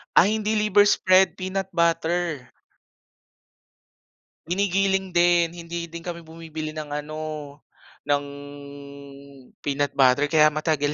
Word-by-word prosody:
Ay 200 +4 +6
hindi 215 +1 -1
liver 210 -1 +4
spread, 185 -1 +4
peanut 190 +1 -3
butter. 170 -3 0 2.0
Ginigiling 190 +1 0
din, 175 -1 +2
hindi 170 0 -6
din 170 0 -9
kami 170 -1 -5
bumibili 160 -1 -7
ng 155 -1 -7
ano, 150 +1 -5 0.9
ng, 145 0 +1 1.3
peanut 145 0 -1
butter 135 +2 +4
kaya 155 -1 +4
matagal 150 -1 0
170 Hz, 105 wpm, -24 LUFS, 155-185 Hz, 2.0 s, Ay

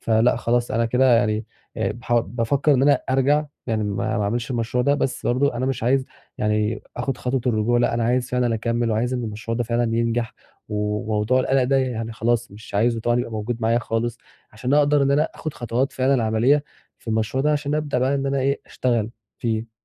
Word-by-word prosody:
فلأ 115 +2 +3
خلاص 120 0 0
أنا 115 +1 +1
كده 125 +1 +4
يعني 110 -1 +1 0.3
آآ - - -1 0.2
ياح 120 - -4
بافكر 120 +6 +1
إن 130 - +2
أنا 145 +1 +4
أرجع 145 +3 +2 0.2
يعني 110 -2 0
ما 100 0 -1
ما - - 0
اعملش 115 +4 -2
المشروع 120 0 0
ده 140 - +3
بس 135 -2 -2
برضه 130 +2 +2
أنا 130 +2 -1
مش 135 -4 -2
عايز 130 +3 +2 0.3
يعني 105 +1 0
آخد 125 +1 -2
خطوة 130 0 -1
الرجوع 120 +1 +2
لأ 120 - +2
أنا 115 -1 0
عايز 125 +1 +1
فعلًا 125 -2 +1
أكمّل 115 +1 -1
وعايز 120 +4 0
إن 125 -2 -2
المشروع 110 +1 -4
ده 120 - 0
فعلًا 115 0 0
ينجح، 115 0 -1 0.3
وموضوع 105 +3 0
القلق 135 0 +2
ده 135 +2 +2
يعني 115 -4 -1
خلاص 120 +1 0
مش 105 +1 -12
عايزه 115 +2 +2
طبعًا 120 +2 +1
يبقى 120 -1 -2
موجود 110 +2 -3
معايا 115 +1 +3
خالص 115 0 -2 0.3
عشان 125 +6 -1
أقدر 145 -1 +4
إن 140 - +2
أنا 145 +2 +4
آخد 155 -2 -6
خطوات 120 +3 -1
فعلًا 130 -2 +2
عملية 125 +7 +3 0.3
في - - -13
المشروع 110 +4 0
ده 150 0 +3
عشان 145 0 -1
أبدأ 150 -3 -1
بقى 130 +2 +1
إن 140 0 -1
أنا 140 0 0
إيه 140 +2 0
اشتغل 115 -3 -1 0.3
فيه. 115 -1 -2
120 Hz, 205 wpm, -23 LUFS, 115-130 Hz, 0.3 s, كده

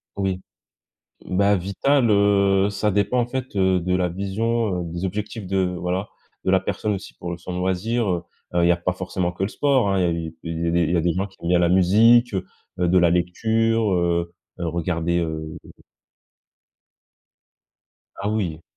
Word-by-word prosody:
Oui. 95 -2 -2 0.8
Bah, 100 +2 +2
vital, 115 +8 +1
heu, 100 -1 +3
ça 100 +1 0
dépend 105 +5 +1
en 120 - 0
fait, 130 -3 -5
heu, 95 -1 +3
de 90 +1 0
la 90 -1 +1
vision, 100 +1 -1
heu, 85 -1 -6
des 85 +2 -3
objectifs 105 +2 -4
de 95 0 -1 0.2
voilà, 90 +3 -2 0.4
de 95 - +2
la 95 - +5
personne 105 +2 -2
aussi 95 - -7
pour 85 0 -6
le 85 - -5
son 90 +1 -6
loisir, 100 +5 0
heu 85 -2 -1 0.3
heu, 85 - +3
il - - +4
y - - +5
a - - +3
pas 90 +1 -1
forcément 90 -1 -2
que 90 +2 -4
le 100 - -1
sport, 135 -7 +2
hein, 95 -1 +1
il - - +2
y - - +2 0.2
a - - -7
il 85 0 -4
y - - 0
a - - +1
des 85 0 +2
il 80 - 0
y - - +3
a - - +2
des 85 -1 +1
gens 95 +3 -1
qui 95 - -23
aiment 85 - -3
bien 90 -1 +4
la 85 -1 +3
musique, 110 +6 +5
heu, 95 -1 -1 0.3
de 90 +1 +2
la 85 -1 +5
lecture, 110 +4 +1
heu 85 -1 0 0.3
heu, 85 - -2
regarder, 85 +1 -1
heu 80 -1 -4 2.6
Ah 100 +2 -3
oui. 85 -7 -2
95 Hz, 200 wpm, -23 LUFS, 85-105 Hz, 2.6 s, la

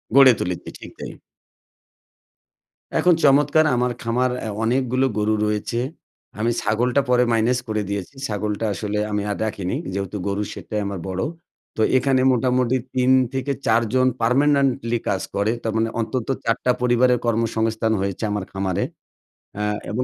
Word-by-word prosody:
গড়ে 135 -1 +9
তুলেছি, 90 0 -3
ঠিক - - -10
তাই। - - -6 1.9
এখন 180 - +5
চমৎকার 145 +2 +5
আমার 125 0 +1
খামার 125 +2 0
অ্যা 110 - -4
অনেকগুলো 130 +2 +1
গরু 105 +1 +1
রয়েছে। 105 +2 -1 0.6
আমি 115 +2 +1
ছাগলটা 120 +5 +1
পরে 125 0 +4
মাইনাস 115 +2 +2
করে 110 -1 -1
দিয়েছি। 100 +4 -4
ছাগলটা 105 +1 -2
আসলে 105 +3 -3
আমি 105 - 0
আর - - -3
রাখিনি, 100 -4 -3 0.2
যেহেতু 100 +1 -3
গরুর 100 +1 -1
সেটাই 105 -1 -4
আমার 100 -2 -4
বড়ো। 95 0 -2 0.5
তো - - 0 0.2
এখানে 130 0 +2
মোটামুটি 125 0 +2 0.2
৩ 130 0 +3 0.2
থেকে 135 +1 -1
৪ 115 +1 +4
জন 130 0 +4
পার্মানেন্টলি 130 -1 +2
কাজ 95 - 0
করে। 100 +2 +1
তার 110 -1 -1
মানে 115 0 +1
অন্তত 115 +1 -2 0.2
৪ 115 - +2
টা 125 - +5
পরিবারের 125 0 +3
কর্মসংস্থান 110 -1 0
হয়েছে 100 +2 -3
আমার 105 -2 -2
খামারে। 95 0 -1 0.8
আ - - -1 0.3
এবং 120 +4 -1
115 Hz, 150 wpm, -22 LUFS, 105-125 Hz, 1.9 s, গড়ে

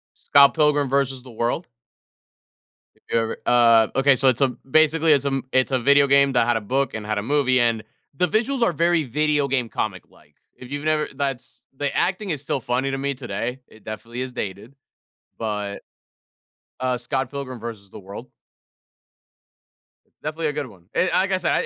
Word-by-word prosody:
Scott 140 -1 +5
Pilgrim 150 -3 +2
vs. 135 -1 0
the 130 - -13
World. 120 +9 -2 1.3
Have - - -33
you - - +2
ever 115 0 -3
Ah, 115 -2 +5
okay, 135 0 +4
so 135 +1 +3
it's 125 - +1
a, 135 - +4 0.2
basically 155 +1 +4
it's 140 -1 +3
a - - +1
m 135 -1 -2
it's 130 +1 +2
a 130 - +3
video 140 +3 +4
game 140 0 +4
that 120 -2 +2
had 120 - +2
a 115 - -1
book, 135 +6 -1
and 110 -1 -5
had 105 -1 -1
a 105 - -2
movie, 130 0 +2
and 115 -2 +1 0.3
the 180 +6 +1
visuals 235 - 0
are 205 - +3
very 170 0 +2
video 145 +2 0
game, 125 -3 0
comic-like, 100 -4 -6 0.2
if 125 0 -12
you've 145 +1 -4
never 155 -1 +1
that's 135 -2 -5
the 145 +1 -2
acting 190 +2 0
is 150 -4 -3
still 140 -1 -2
funny 125 +3 -1
to 135 - -3
me, 140 0 -1
today. 125 +1 -4
It 110 - -19
definitely 115 +3 -7
is 130 0 -4
dated, 105 +2 -6 0.6
but 105 -2 -4 1.0
Uh, 130 -1 0
Scott 130 +2 -2
Pilgrim 135 -3 -6
vs. 110 -4 -8
the - - -10
World. 100 +5 -10 1.8
It's - - -43
definitely 155 +1 -3
a - - -1
good 145 -1 -3
one, 90 -7 -17
and 185 - +2
like 190 +1 +2
I 190 - +3
said, 175 -2 0
135 Hz, 190 wpm, -23 LUFS, 120-145 Hz, 1.8 s, Scott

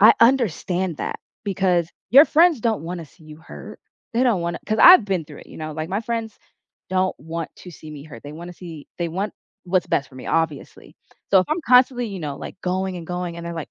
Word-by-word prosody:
I 215 +3 +8
understand 190 - +2
that, - - -4 0.3
because 185 -4 +1 0.2
your 280 +5 +9
friends 320 -5 +4
don't 225 -5 0
wanna 170 0 -5
see 155 +2 -21
you 155 -1 -12
hurt. 160 - -11 0.4
They 240 - +2
don't 235 -8 +2
wanna 170 0 -3
'cause 215 0 0
I've 360 - +9
been 190 -5 -1
through 150 -1 -12
it, - - -15
you - - -12
know? 155 -1 -5
Like, 155 +1 -5
my 195 +3 -1
friends 230 -1 -4 0.5
don't 185 0 +1
want 165 +3 -5
to 180 - -11
see 155 -2 -12
me 145 -2 -9
hurt. 140 -7 -12
They 145 - -9
wanna 170 +3 -9
see 165 -4 -10
they 170 - -1
want 195 +5 -3 0.3
what's 180 -1 +1
best 140 - 0
for - - -19
me, 130 - -9
obviously. 160 -4 -2 0.4
So, 195 - +6
if 185 - -2
I'm 320 +3 0
constantly, 250 -1 +4
you 195 -4 -6
know, 145 -3 -4
like, 185 - -9
going 185 +1 -2
and 170 -2 -8
going 180 -1 -4
and 170 - -7
they're, 170 - -5
like, 165 -2 -6
180 Hz, 230 wpm, -22 LUFS, 160-215 Hz, 0.5 s, your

